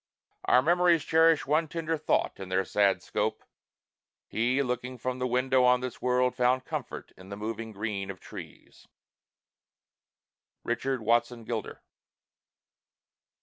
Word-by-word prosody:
Our 125 - +5
memories 175 0 +3
Cherish 160 0 +4
one 155 +3 +1
tender 165 0 -2
thought 155 - 0
in 95 -1 -7
their 95 +1 +1
sad 100 0 +2
scope: - - -2 0.8
He, 125 +5 0
looking 125 0 -3
from 130 +1 -3
the 125 - 0
window 125 +1 +2
on 125 0 +4
this 125 -1 -6
world, 125 0 +2
Found 130 +1 +2
comfort - - -6
in 95 +1 -14
the 100 - -6
moving 110 +1 -5
green 100 -2 -4
of 95 -1 -7
trees. - - -12 1.8
RICHARD 130 +1 -1
WATSON 120 +1 +1
GILDER. 110 -1 -5
125 Hz, 130 wpm, -28 LUFS, 110-135 Hz, 1.8 s, Our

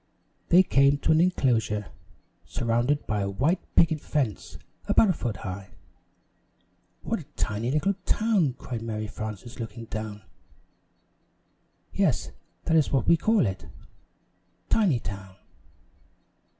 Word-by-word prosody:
They 180 +2 +7
came 140 -3 +4
to 145 - +1
an 160 +1 +5
enclosure, 115 - +1 0.5
surrounded 120 +5 0
by 105 -1 -1
a 100 - -1
white 145 - +1 0.2
picket 160 -2 +4
fence 130 -9 -2 0.3
about 215 - +5
a - - 0
foot 120 - -4
high. 95 0 -7 1.3
"What - - -1
a - - -10
tiny 110 +3 -2
little 150 +8 +1
town!" 205 - +2
cried 120 -2 -6
Mary 110 -1 -3
Frances, 110 +3 -7
looking 115 0 -6
down. 110 -2 -6 1.7
"Yes, - - +1 0.3
that 165 - +1
is 155 -3 +3
what 135 -3 +1
we 170 - +7
call 215 - +2
it 95 -2 -4 1.0
Tinytown." 100 - 0
120 Hz, 120 wpm, -26 LUFS, 105-155 Hz, 1.7 s, They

